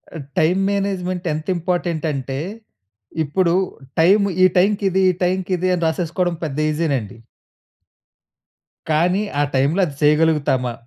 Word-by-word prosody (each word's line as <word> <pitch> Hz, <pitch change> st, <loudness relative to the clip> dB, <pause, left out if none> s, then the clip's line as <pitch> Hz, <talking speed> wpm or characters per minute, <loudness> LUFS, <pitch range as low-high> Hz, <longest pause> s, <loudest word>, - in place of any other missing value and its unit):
ఆహ్, 155 Hz, -, -6 dB, 0.2 s
time 175 Hz, +4 st, +2 dB
management 185 Hz, -2 st, -2 dB
ఎంత 155 Hz, +1 st, -5 dB
important 170 Hz, -2 st, -2 dB
అంటే, 135 Hz, 0 st, -4 dB, 0.8 s
ఇప్పుడు 170 Hz, +4 st, +1 dB, 0.5 s
టైమ్ 200 Hz, +5 st, +5 dB, 0.2 s
ఈ -, -, +8 dB
టైమ్‌కి 200 Hz, +3 st, +2 dB
ఇది, 190 Hz, +1 st, +1 dB
ఈ -, -, -5 dB
టైమకి 185 Hz, +1 st, -1 dB
ఇది, 185 Hz, +1 st, 0 dB
అని 170 Hz, -, -3 dB
రాసేసుకోవడం 175 Hz, +2 st, -1 dB
పెద్ద 145 Hz, -3 st, -5 dB
ఈజీ 160 Hz, +2 st, -1 dB
నండి. 115 Hz, -2 st, -5 dB, 1.7 s
కానీ, 175 Hz, +6 st, +2 dB, 0.2 s
ఆ -, -, +3 dB
టైమ్‌లో 140 Hz, +8 st, +2 dB
అది 145 Hz, -5 st, -7 dB
చేయగలుగుతామా? 150 Hz, -5 st, +2 dB
170 Hz, 135 wpm, -20 LUFS, 150-185 Hz, 1.7 s, ఈ